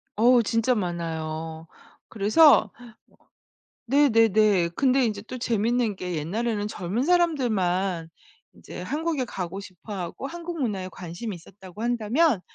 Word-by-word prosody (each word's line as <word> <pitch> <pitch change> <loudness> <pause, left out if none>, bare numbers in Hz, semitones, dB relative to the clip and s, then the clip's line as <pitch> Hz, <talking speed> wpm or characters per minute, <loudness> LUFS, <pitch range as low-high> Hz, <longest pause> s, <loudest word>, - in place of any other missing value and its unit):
어우. 240 +2 +5
진짜 230 +3 +1
많아요. 160 -3 -4 0.4
그래서 220 +10 +5 1.1
네네네. 220 -8 +4
근데 265 -1 +3
인제 210 -2 -2
또 255 - -7
재밌는 235 -1 0
게 180 -2 -4
옛날에는 205 +7 -2
젊은 205 +4 -3
사람들만 200 - +1 0.5
이제 - - -10
한국에 300 - -2
가고 190 -3 -5
싶어 190 +3 -10
하고 185 +8 -5
한국 340 +1 -6
문화에 195 -6 -2
관심이 180 +5 -6
있었다고 185 +4 -13
한다면 240 - +1
215 Hz, 275 characters per minute, -25 LUFS, 180-250 Hz, 1.1 s, 어우